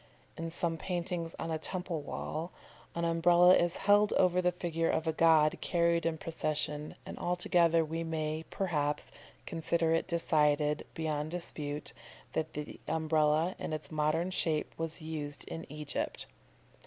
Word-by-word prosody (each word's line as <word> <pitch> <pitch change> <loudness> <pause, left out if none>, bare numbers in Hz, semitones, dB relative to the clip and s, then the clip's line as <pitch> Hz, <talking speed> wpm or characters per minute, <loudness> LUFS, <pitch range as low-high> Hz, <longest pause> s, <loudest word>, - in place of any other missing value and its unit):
In 165 0 -4
some 165 0 -1
paintings 175 -1 -3
on 165 - -4
a 160 - -1
temple 175 -1 -3
wall, 160 +4 -4 0.4
an 170 0 0
Umbrella 175 +2 +6
is 175 0 +2
held 205 +1 +5
over 180 -1 +3
the 180 0 +3
figure 165 -2 -1
of 160 - 0
a 160 - +1
god 160 -1 +4
carried 170 -1 +2
in 160 -1 -1
procession, 150 -1 -2
and - - -8
altogether 170 -2 +3
we 165 +2 -3
may, 155 -1 -2
perhaps, 150 -6 -1 0.3
consider 165 0 0
it 165 - +1
decided, 150 -3 +2
beyond 155 -2 -2
dispute, 150 -4 -4 0.4
that 160 0 -2
the 150 0 -6
Umbrella 160 +1 +2
in - - -4
its 155 +1 -5
modern 155 +4 +1
shape 160 -4 -1
was 165 0 -3
used 150 -2 -4
in 165 -3 -7
Egypt. 150 -1 -3
165 Hz, 145 wpm, -32 LUFS, 155-170 Hz, 0.4 s, Umbrella